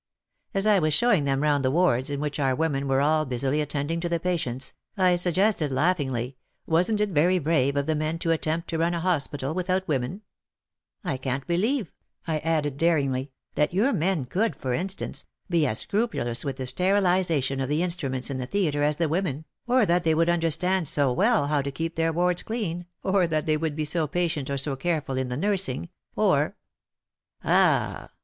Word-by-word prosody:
As 195 +1 +3
I 210 -2 +5
was 155 -2 +1
showing 225 -11 +3
them 135 +1 0
round 145 -2 +2
the 130 - +2
wards 135 -5 +2
in 140 -1 -3
which 150 0 -3
our 135 -2 +1
women 140 -2 -1
were 135 0 +2
all 155 +2 +3
busily 135 +2 -1
attending 150 +2 -2
to 170 0 -2
the 170 -1 0
patients, 145 -8 -2 0.2
I 185 -2 +4
suggested 175 -1 +2
laughingly, 135 -4 0 0.3
wasn't 180 +6 +2
It 210 - +1
very 175 +3 +3
brave 145 -4 +1
of 140 0 0
the 160 - +1
men 155 +2 -1
to 165 0 -1
attempt 165 +1 -1
to 165 - -1
run 170 +1 +1
a - - -1
hospital 150 -5 -1
without 185 +1 -1
women? 145 +7 -2 0.8
I 170 -8 -2
can't 130 +1 -3
believe," 205 - 0 0.3
I 160 -2 -1
added, 150 -3 -1
daringly, 140 -5 +1 0.2
"that 150 +4 0
your 240 +8 +3
men 165 -4 0
could, 210 - 0
for 130 -2 -3
Instance, 190 +7 -3 0.3
be 165 -3 +3
as 110 - +2
scrupulous 160 - 0
with 135 -1 -4
the 130 - -4
sterilization 180 -5 +1
of 135 0 -2
the 150 +4 +1
instruments 140 -7 -1
in 130 - -3
the 125 - -4
theatre 155 -5 0
as 150 0 +1
the 170 - +1
women, 155 -2 -2 0.2
or 250 -2 +4
that 175 -1 +2
they 160 -2 +2
would 165 +1 +2
understand 175 +1 +1
so 140 -3 +2
well 210 - +3
how 145 0 +1
to 140 - -3
keep 165 +3 -4
their 165 0 +1
wards 175 +1 +1
clean, 180 -7 -4 0.2
or 190 -2 +2
that 155 -2 -1
they 155 - +2
would 155 -1 -2
be 155 0 -2
so 155 +1 0
patient 160 -3 -1
or 140 - -1
so 140 0 -1
careful 145 -1 -2
In 130 0 -1
the 125 - -3
nursing, 185 - -1 0.3
or - - +2 0.5
" - - -44
"Ah!" - - +2
160 Hz, 200 wpm, -25 LUFS, 140-180 Hz, 0.8 s, I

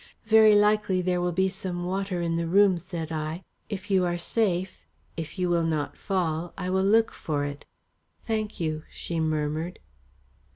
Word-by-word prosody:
"Very 220 -1 +7
likely 205 -3 +3
there 180 0 +1
will 175 0 0
be 190 +2 +2
some 185 -2 -4
water 190 -1 -2
in 165 -1 0
the 170 0 -1
room," 190 0 +4
said 170 -3 -6
I. 160 +3 -3 0.3
"If 205 0 -5
you 190 -2 +4
are 175 -1 0
safe, 185 -1 -1 0.3
if 165 +3 -6
you 180 -1 +1
will 170 -1 +2
not 155 -3 -1
fall, 175 -3 -2
I 180 -1 -3
will 190 0 +2
look 220 +3 +4
for 145 -2 -2
it." 145 0 -7 0.6
"Thank 215 -1 -2
you," 155 -2 -1
she 170 -1 -4
murmured. 155 +2 -1
180 Hz, 170 wpm, -27 LUFS, 165-195 Hz, 0.6 s, Very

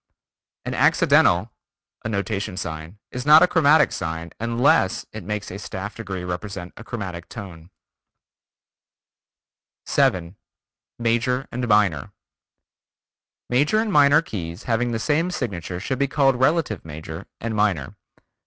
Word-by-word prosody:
An - - -3
accidental 95 +6 +4 0.5
(a 110 - -3
notation 100 -2 -2
sign) 80 +1 -6
is 125 - -4
not 150 +3 +8
a - - +5
chromatic 155 -2 +4
sign 80 +1 -4
unless 115 -3 +2
it 110 -3 -7
makes 105 +2 -4
a 95 - -6
staff 100 +1 -6
degree 95 -5 -6
represent 90 0 -5
a - - -10
chromatic 95 -8 -6
tone. 90 -6 -9 2.2
7. 90 0 +1 0.6
Major; 120 +3 0
Minor: 105 - +1 1.3
Major 145 +11 +2
and 215 -2 0
Minor 145 +1 +6
keys 85 - -6
having 120 +1 0
the 115 - -1
same 155 +9 +1
signature 95 - -4
should 130 +7 -3
be 140 - +2
called 135 -1 +3
relative 135 - +1
major 80 +3 -8
and 115 -1 -3
minor. 100 -10 0
105 Hz, 125 wpm, -23 LUFS, 90-125 Hz, 2.2 s, not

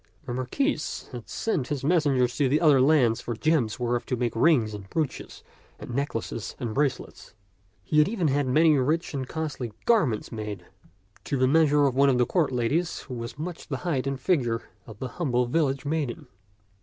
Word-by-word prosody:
The 125 - -4
Marquis 130 - 0 0.3
had - - -9
sent 155 - -1
his 145 -3 -3
mes 160 +1 +2
sengers 125 -3 +2
to 145 +1 +2
other 145 -5 +5
lands 130 -5 +3
for 120 - -4
gems 135 -5 +1
whereof 120 0 0
to 125 - 0
make 120 -2 -2
rings 115 -5 +3
and 100 -2 -9
brooches 155 -4 -4 0.3
and 120 - -8
necklaces 120 -4 -3
and 115 -3 -3
bracelets. 140 -4 -2 0.5
He 150 - +2
had 150 - +4
even 195 -7 0
had 140 -1 +1
many 155 +4 +4
rich 155 +7 0
and 130 -2 -3
costly 145 -8 -4
garments 155 - +2
made 105 -5 -6 0.6
to 140 - -1
the 130 0 +3
measure 150 0 +4
of 135 - +2
one 140 +2 +4
of 130 - +3
the 125 - +3
court 165 -2 +1
ladies 140 +8 -1
who 130 - -9
was 115 +2 -6
much 170 +3 -6
the - - -3
height 140 -6 0
and 135 -1 -2
figure 130 -8 0 0.2
of 110 -2 -10
the 130 - -4
humble 125 -3 0
village 135 +1 0
maiden. 150 -1 -2
135 Hz, 190 wpm, -26 LUFS, 120-155 Hz, 0.6 s, other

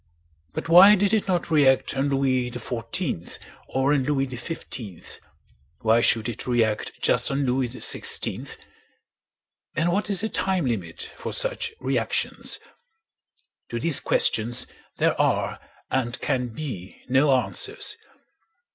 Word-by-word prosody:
But - - -4
why 185 +5 +9
did 205 +1 +1
it 215 -2 +1
not 175 -2 -1
react 140 -4 +3
on 135 +1 0
Louis 130 -2 +1
XIV 120 - -3 0.3
or 135 +2 +1
on 140 -3 +2
Louis 135 -1 +1
XV—why 110 - -4
should 115 -1 +3
it 120 0 -6
react 115 -3 0
just - - +3
on 140 0 0
Louis 125 0 0
XVI? 125 - 0 1.2
And 170 +2 +1
what 205 +3 -1
is 200 -2 +4
the 220 - -1
time 185 -4 0
limit 95 -9 -4
for - - -5
such - - -1
reactions? - - -1 1.1
To 120 - -3
these 155 +3 +3
questions 120 +3 +3 0.3
there - - +2
are - - 0 0.3
and 125 -2 -1
can 125 -1 -1
be 110 - -7
no 135 +3 +3
answers. 125 - -1
130 Hz, 125 wpm, -24 LUFS, 120-170 Hz, 1.2 s, why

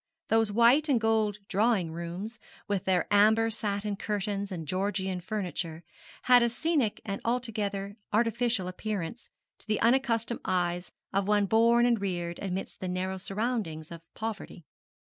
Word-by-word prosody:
Those 225 -1 +3
white 240 +8 +5
and 260 -4 +4
gold 220 -2 +2
drawing 205 -4 +2
rooms, 175 +7 -6 0.3
with 200 -3 -1
their 185 -2 +2
amber 220 +2 +5
satin 205 -2 -2
curtains 200 -1 -2
and 165 -4 -5
Georgian 190 0 -1
furniture, 175 -4 -4 0.4
had 250 -1 +7
a 235 - +3
scenic 280 -3 0
and 200 -2 -3
altogether 210 -4 -2
artificial 230 -2 +1
appearance 200 +2 -4 0.3
to - - -23
the 215 -1 +1
unaccustomed 235 -1 +2
eyes 175 -1 -1 0.2
of 195 0 +1
one 205 -1 +3
born 230 +3 +4
and 235 -4 +2
reared 175 -3 -3
amidst 190 -1 -4
the 185 - -4
narrow 185 +1 -2
surroundings 195 -6 -3
of 170 -1 -8
poverty. 210 -6 -6
205 Hz, 145 wpm, -29 LUFS, 185-230 Hz, 0.4 s, had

